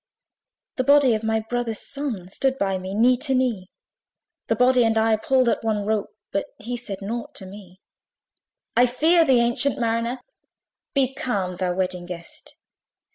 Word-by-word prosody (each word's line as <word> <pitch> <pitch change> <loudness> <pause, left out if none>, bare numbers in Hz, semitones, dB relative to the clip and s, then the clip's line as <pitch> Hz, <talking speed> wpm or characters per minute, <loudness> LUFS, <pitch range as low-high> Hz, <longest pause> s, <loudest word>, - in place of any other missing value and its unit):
The 255 - +1
body 280 -2 +5
of 215 0 -2
my 220 0 +1
brother's 230 -1 -3
son, 270 -11 -4
Stood 265 +5 0
by 195 -5 0
me, 190 +1 -6
knee 245 +3 +4
to 270 +1 +1
knee: 230 -8 0 0.8
The - - +1
body 250 0 +4
and 225 -1 +2
I 220 0 +3
pulled 255 +3 +2
at 235 - +1
one 215 -2 -1
rope, 215 -1 -1 0.2
But 195 - -1
he 240 +3 -5
said 205 -5 -6
nought 230 +4 -5
to 190 - -6
me. 190 -1 -12 1.0
"I 245 +1 +5
fear 320 +7 +4
thee, 260 -6 +4
ancient 240 +4 +1
Mariner!" 235 +1 -1 0.8
Be 270 -1 +2
calm, 200 - -2
thou 180 -1 -1
Wedding 180 -1 -2
Guest! 170 -2 -9
230 Hz, 165 wpm, -23 LUFS, 200-255 Hz, 1.0 s, body